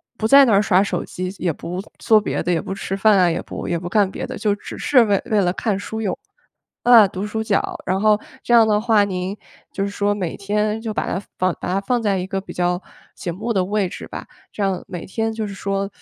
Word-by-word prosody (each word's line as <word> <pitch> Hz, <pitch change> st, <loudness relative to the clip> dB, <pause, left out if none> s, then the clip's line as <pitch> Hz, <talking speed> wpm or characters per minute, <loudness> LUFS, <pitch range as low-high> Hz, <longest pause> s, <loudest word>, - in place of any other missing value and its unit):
不 220 Hz, -, -1 dB
在 275 Hz, +2 st, +8 dB
那 230 Hz, -, +3 dB
儿 200 Hz, -, +5 dB
刷 195 Hz, -2 st, +3 dB
手 180 Hz, -3 st, -2 dB
机， 185 Hz, +1 st, -5 dB
也 175 Hz, -, 0 dB
不 175 Hz, +4 st, -5 dB, 0.2 s
做 215 Hz, -2 st, +4 dB
别 -, -, -2 dB
的， 180 Hz, -, 0 dB
也 165 Hz, -, +1 dB
不 -, -, -7 dB
吃 195 Hz, 0 st, -3 dB
饭 205 Hz, +1 st, +4 dB
啊， 180 Hz, -2 st, +5 dB
也 165 Hz, -, -2 dB
不 -, -, -7 dB
也 170 Hz, -, -1 dB
不 175 Hz, +1 st, -6 dB
干 200 Hz, -1 st, +3 dB
别 -, -, -5 dB
的， -, -, -6 dB
就 210 Hz, -2 st, +1 dB
只 -, -, -9 dB
是 255 Hz, -4 st, +4 dB
为 200 Hz, -2 st, +2 dB
为 215 Hz, -4 st, +2 dB
了 180 Hz, -2 st, +2 dB
看 205 Hz, -2 st, -1 dB
书 220 Hz, +2 st, -5 dB
用。 190 Hz, -, -1 dB, 0.7 s
嗯， 235 Hz, -4 st, +8 dB
读 190 Hz, 0 st, -5 dB
书 220 Hz, +1 st, -3 dB
角。 210 Hz, -2 st, 0 dB
然 190 Hz, +1 st, 0 dB
后 210 Hz, -1 st, +4 dB, 0.2 s
这 -, -, -5 dB
样 230 Hz, -2 st, +7 dB
的 210 Hz, -1 st, +2 dB
话 220 Hz, -3 st, +4 dB
您 190 Hz, +1 st, -3 dB, 0.3 s
就 195 Hz, -, -2 dB
是 200 Hz, -, -2 dB
说 205 Hz, 0 st, 0 dB
每 180 Hz, -5 st, -3 dB
天 210 Hz, +2 st, -1 dB
就 225 Hz, -, -3 dB
把 -, -, -2 dB
它 -, -, -2 dB, 0.2 s
放 185 Hz, -1 st, +1 dB
把 -, -, -3 dB
它 195 Hz, -, +1 dB
放 240 Hz, +5 st, 0 dB
在 205 Hz, -3 st, +1 dB
一 180 Hz, -, -2 dB
个 195 Hz, 0 st, -3 dB
比 -, -, -10 dB
较 180 Hz, +1 st, 0 dB, 0.3 s
醒 175 Hz, -, -4 dB
目 225 Hz, +5 st, -2 dB
的 190 Hz, -3 st, +2 dB
位 200 Hz, 0 st, 0 dB
置 -, -, -8 dB
吧， -, -, -7 dB, 0.3 s
这 205 Hz, -, -3 dB
样 190 Hz, -2 st, -1 dB
每 175 Hz, -2 st, -6 dB
天 225 Hz, +3 st, -2 dB
就 220 Hz, -1 st, -3 dB
是 200 Hz, -, -7 dB
说 195 Hz, 0 st, -2 dB
200 Hz, 275 characters per minute, -21 LUFS, 185-215 Hz, 0.7 s, 在